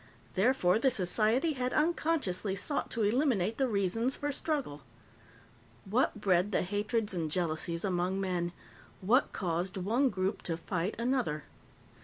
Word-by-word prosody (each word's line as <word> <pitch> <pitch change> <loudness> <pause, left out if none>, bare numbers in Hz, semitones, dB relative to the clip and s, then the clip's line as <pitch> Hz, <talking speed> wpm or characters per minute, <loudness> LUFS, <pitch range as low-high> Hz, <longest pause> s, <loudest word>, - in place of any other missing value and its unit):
Therefore, 195 -2 +3
the 265 - +4
society 225 - +2
had 255 -2 -2
unconsciously 305 - +1
sought 285 +8 0
to 230 - -1
eliminate 225 -2 +1
the 265 - +3
reasons 225 +4 0
for 290 0 -2
struggle. 280 - -2 1.0
What 215 +2 +1
bred 190 0 +2
the - - +1
hatreds 205 +3 -1
and 165 -3 -2
jealousies 170 +1 -1
among 185 0 0
men? 180 -3 -1 0.5
What 230 +8 +3
caused 180 +1 -2
one 230 +9 +2
group 190 -1 -2
to 165 -2 -3
fight 180 +3 -2
another? 235 - 0
205 Hz, 135 wpm, -31 LUFS, 180-250 Hz, 1.0 s, the